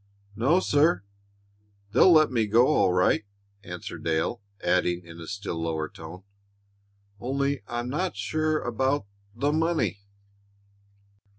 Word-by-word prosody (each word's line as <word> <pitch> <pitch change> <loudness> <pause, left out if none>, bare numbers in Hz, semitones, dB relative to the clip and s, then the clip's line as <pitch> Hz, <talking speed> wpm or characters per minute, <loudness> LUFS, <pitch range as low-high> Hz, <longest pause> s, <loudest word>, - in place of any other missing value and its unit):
"N 110 - -9
o, 155 +9 +4
sir. 150 - +2 0.9
They'll 130 - +6
let 155 -3 +5
me 115 -4 +1
go 115 +4 +5
all 95 -11 +3
right," 90 +3 +2 0.4
answered 90 -1 -7
Dale, 80 +8 -1 0.2
adding, 90 0 +1
in 85 0 -11
a 80 - -9
still 100 -5 -4
lower 80 -1 -2
tone, 80 +5 -11 1.0
"only 140 +3 -1
I 120 0 -3
I'm 120 - -5
not 180 +7 -2
sure 155 0 0
about 130 +1 0 0.3
the 145 +5 0
money." 160 -9 0
120 Hz, 130 wpm, -26 LUFS, 90-145 Hz, 1.0 s, They'll